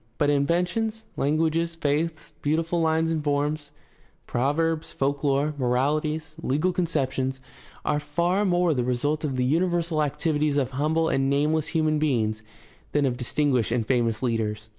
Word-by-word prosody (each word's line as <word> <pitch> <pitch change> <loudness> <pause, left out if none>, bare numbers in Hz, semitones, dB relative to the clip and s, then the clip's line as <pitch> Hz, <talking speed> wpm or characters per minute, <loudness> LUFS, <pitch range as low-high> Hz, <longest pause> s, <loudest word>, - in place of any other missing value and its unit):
But 145 0 +2
inventions, 180 +10 0
languages, 160 +3 +1
faiths, 155 +1 -2
beautiful 165 +3 0
lines 160 0 +2
and 155 -2 -1
forms, 145 +1 -1 0.6
proverbs, 155 +5 0
folk 140 +1 -1
lore, 145 +1 +1
morahties, 150 +5 0
legal 155 +5 +1
conceptions, 135 -6 -1 0.5
are 145 - +1
far 170 +7 0
more 175 -3 +2
the 125 -3 0
result 145 +5 -1
of 140 -4 -1
the 125 0 +1
universal 170 +2 +1
activities 150 0 0
of 130 -2 0
humble 155 +4 +1
and 135 -2 +1
nameless 150 +2 +1
human 155 -2 +1
beings 110 -8 0 0.5
than 145 -1 +3
of 125 -2 0
distinguished 125 -1 0
and 115 -2 0
famous 115 -2 0
leaders. 110 -2 -1
150 Hz, 140 wpm, -25 LUFS, 135-165 Hz, 0.6 s, than